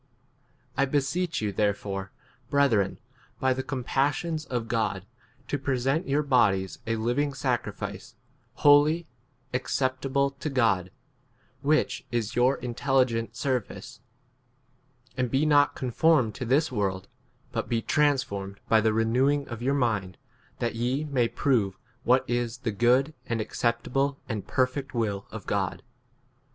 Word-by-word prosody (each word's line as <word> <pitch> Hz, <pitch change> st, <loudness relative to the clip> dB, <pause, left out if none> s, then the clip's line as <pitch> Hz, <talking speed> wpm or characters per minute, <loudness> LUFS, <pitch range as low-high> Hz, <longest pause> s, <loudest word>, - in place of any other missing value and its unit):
I 140 Hz, -, +4 dB
beseech 145 Hz, +5 st, -1 dB
you 105 Hz, -, 0 dB
therefore, 100 Hz, -1 st, -1 dB, 0.4 s
breth 140 Hz, -2 st, +3 dB
ren, 100 Hz, -3 st, +1 dB, 0.4 s
by 130 Hz, 0 st, +2 dB
the 130 Hz, -, -3 dB
compassions 145 Hz, +5 st, -1 dB
of 120 Hz, -3 st, -3 dB
God, 105 Hz, -5 st, -1 dB, 0.4 s
to 145 Hz, -, -2 dB
present 135 Hz, +4 st, 0 dB
your 145 Hz, +2 st, +2 dB
bodies 100 Hz, -, +2 dB
a 115 Hz, -, +1 dB
living 125 Hz, +6 st, 0 dB
sacrifice, 125 Hz, -4 st, -3 dB, 0.4 s
holy, 150 Hz, +3 st, +5 dB, 0.5 s
acceptable 130 Hz, +2 st, 0 dB
to 140 Hz, +2 st, -5 dB
God, 110 Hz, -9 st, +2 dB, 0.7 s
[which 155 Hz, +2 st, +1 dB
is] 120 Hz, -3 st, -2 dB
your 125 Hz, +3 st, +3 dB
intelligent 120 Hz, -2 st, 0 dB
ser 130 Hz, +2 st, +1 dB
2 105 Hz, -, -19 dB
vice. -, -, -11 dB, 1.2 s
And 125 Hz, -1 st, 0 dB
be 135 Hz, +4 st, +2 dB
not 145 Hz, -1 st, +4 dB
conformed 130 Hz, -2 st, +2 dB
to 125 Hz, -, -5 dB
this 145 Hz, +5 st, +2 dB
world, 95 Hz, -5 st, -2 dB, 0.4 s
but -, -, -3 dB
be 115 Hz, -2 st, 0 dB
transformed 130 Hz, -10 st, 0 dB
by 110 Hz, -1 st, +5 dB
the 110 Hz, 0 st, +2 dB
renewing 130 Hz, +6 st, +2 dB
of 120 Hz, -2 st, -6 dB
yourP 135 Hz, +3 st, +1 dB
mind, 105 Hz, -8 st, 0 dB, 0.4 s
that 120 Hz, -, -1 dB
ye 125 Hz, +5 st, -1 dB
may 135 Hz, -6 st, +1 dB
prove 115 Hz, -9 st, +1 dB, 0.2 s
* 125 Hz, -, -38 dB
what 125 Hz, +2 st, +3 dB
[is] 120 Hz, 0 st, -1 dB
the 125 Hz, -3 st, -3 dB
good 125 Hz, +8 st, +3 dB
and 115 Hz, -1 st, -1 dB
acceptable 120 Hz, +5 st, 0 dB
and 110 Hz, -5 st, -4 dB
perfect 130 Hz, +1 st, -1 dB
will 105 Hz, -4 st, -1 dB
of 110 Hz, -, -8 dB
3 -, -, -26 dB
God. 95 Hz, -2 st, -1 dB
125 Hz, 140 wpm, -27 LUFS, 110-140 Hz, 1.2 s, holy